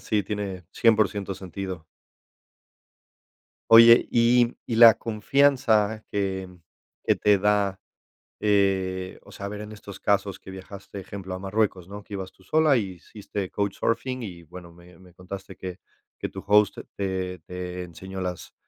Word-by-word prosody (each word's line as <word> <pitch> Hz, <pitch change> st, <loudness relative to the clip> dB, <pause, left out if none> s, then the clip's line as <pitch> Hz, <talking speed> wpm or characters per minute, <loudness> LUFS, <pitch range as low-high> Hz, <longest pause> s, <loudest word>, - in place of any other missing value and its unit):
Sí, 105 Hz, -2 st, 0 dB
tiene 100 Hz, -2 st, -5 dB
100% 105 Hz, -3 st, +2 dB
sentido. 95 Hz, -2 st, -7 dB, 1.9 s
Oye, 115 Hz, +1 st, +9 dB
y 120 Hz, +1 st, +3 dB
y 115 Hz, -, -2 dB
la 115 Hz, -1 st, +10 dB
confianza 110 Hz, -2 st, +2 dB
que 95 Hz, -2 st, -2 dB, 0.6 s
que -, -, +2 dB
te 105 Hz, -1 st, +3 dB
da, 100 Hz, -1 st, +1 dB, 0.6 s
eh, 95 Hz, -3 st, 0 dB
o 100 Hz, -, -16 dB
sea, 100 Hz, +1 st, -6 dB
eh, -, -, -5 dB
ver 105 Hz, 0 st, -6 dB
en 105 Hz, -, -8 dB
estos 100 Hz, -2 st, -11 dB
casos 100 Hz, -1 st, 0 dB
que 95 Hz, -, -11 dB
viajaste, 95 Hz, +1 st, -9 dB
ejemplo, 95 Hz, 0 st, -7 dB
a 90 Hz, -, -5 dB
Marruecos, 95 Hz, -2 st, -1 dB
¿no? 100 Hz, +1 st, -8 dB
Que 105 Hz, -, -12 dB
ibas 95 Hz, -2 st, -5 dB
tú 95 Hz, -, -24 dB
sola 155 Hz, +5 st, +3 dB
y 100 Hz, -5 st, -2 dB
hiciste 95 Hz, +1 st, -7 dB
Couchsurfing 115 Hz, +5 st, -2 dB
y, 90 Hz, -4 st, -8 dB
bueno, 85 Hz, +1 st, -12 dB
me 85 Hz, 0 st, -17 dB
me 90 Hz, -1 st, -18 dB
contaste 95 Hz, +2 st, -9 dB
que 95 Hz, 0 st, -7 dB, 0.4 s
que -, -, -4 dB
tu -, -, -9 dB
host 105 Hz, 0 st, +4 dB, 0.2 s
te 95 Hz, -2 st, -3 dB
te 90 Hz, +2 st, -6 dB
enseñó 95 Hz, +3 st, -8 dB
las, 90 Hz, -1 st, -5 dB
100 Hz, 150 wpm, -25 LUFS, 95-105 Hz, 1.9 s, la